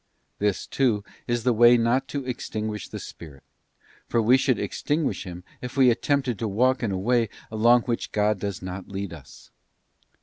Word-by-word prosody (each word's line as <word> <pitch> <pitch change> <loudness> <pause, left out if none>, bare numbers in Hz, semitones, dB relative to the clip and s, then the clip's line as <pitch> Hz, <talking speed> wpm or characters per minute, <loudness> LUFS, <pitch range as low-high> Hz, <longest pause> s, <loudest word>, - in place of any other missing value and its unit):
This, 105 -2 0
too, 115 -7 +1 0.2
is 120 -1 0
the 125 0 +3
way 120 +2 +7
not 120 +3 +1
to 140 -2 -4
extinguish 110 -4 -4
the - - -7
Spirit, 75 -5 -11 0.6
for 115 - +1
we 115 +3 +5
should 130 -2 +2
extin 150 +1 -1
guish - - -2
Him 90 -1 -8 0.2
if 125 +2 -7
we 130 -2 +6
attempted 130 -2 0
to 115 - -1
walk 125 +6 +2
in 115 -4 -1
a 95 - -1
way 115 +3 +1 0.2
along 120 +2 +4
which 120 -2 -3
God 105 -1 +1
does 100 -2 -4
not 95 +1 -6
lead 100 -2 -5
us. 75 -6 -14
115 Hz, 180 wpm, -25 LUFS, 100-125 Hz, 0.6 s, way